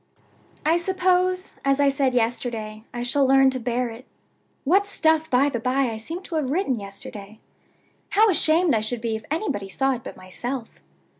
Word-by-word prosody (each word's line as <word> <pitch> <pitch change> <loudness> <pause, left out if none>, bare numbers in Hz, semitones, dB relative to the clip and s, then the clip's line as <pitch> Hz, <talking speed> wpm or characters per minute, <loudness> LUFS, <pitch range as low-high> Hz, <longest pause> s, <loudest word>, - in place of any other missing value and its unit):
"I 325 +2 +4
suppose, 370 +1 +1
as 275 0 +2
I 285 -1 +5
said 270 -2 0
yesterday, 225 -2 -2
I 240 0 -4
shall 275 +3 +2
learn 270 0 +5
to 260 - -3
bear 245 +1 -1
it. 235 +4 -12 0.6
(What 390 +8 +3
stuff, 320 -4 +2
by 260 +3 +4
the 260 -5 -2
by, 255 +1 +1
I 220 - -5
seem 330 +12 -6
to 350 - -6
have 285 -4 -1
written 305 -3 +1
yesterday! 200 +1 -9 0.7
How 435 +2 +5
ashamed 330 -3 +3
I 220 - +2
should 225 +2 -1
be 225 -1 -1
if 220 0 -7
anybody 290 - -2
saw 270 +7 +1
it 240 -2 -6
but - - -9
myself!) 235 +6 -6
265 Hz, 180 wpm, -24 LUFS, 230-320 Hz, 0.7 s, I